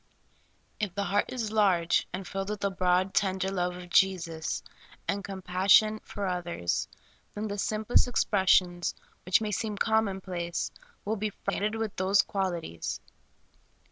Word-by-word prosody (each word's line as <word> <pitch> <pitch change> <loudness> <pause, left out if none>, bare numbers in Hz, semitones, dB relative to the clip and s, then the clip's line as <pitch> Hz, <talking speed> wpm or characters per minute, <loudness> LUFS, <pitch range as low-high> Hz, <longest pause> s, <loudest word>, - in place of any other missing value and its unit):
If 205 -5 -2
the 200 - 0
heart 200 +2 +1
is 230 -4 -3
large 185 -6 +3
and 185 0 -5
filled 195 +1 -3
with 210 -1 -4
the 200 - +1
broad, 185 +1 +2
tender 190 -1 +1
love 180 -2 -1
of 180 -1 -10
Jesus, 170 -5 +1 0.4
and 200 0 -1
compassion 195 +3 +3
for 205 -1 -5
others, 175 - -1 0.5
then 210 +1 -3
the 205 0 -4
simplest 215 +5 +2
expressions, 185 -6 +2 0.3
which 185 +4 +4
may 215 -1 -2
seem 210 +1 -2
common 220 -3 +1
place, 175 -2 -3 0.3
will 220 +2 -1
be 215 +1 -1
freighted 210 +1 -2
with 225 -2 -3
these 190 +2 +4
qual 195 -2 -1
ities. 120 - -5
195 Hz, 145 wpm, -29 LUFS, 180-210 Hz, 0.5 s, which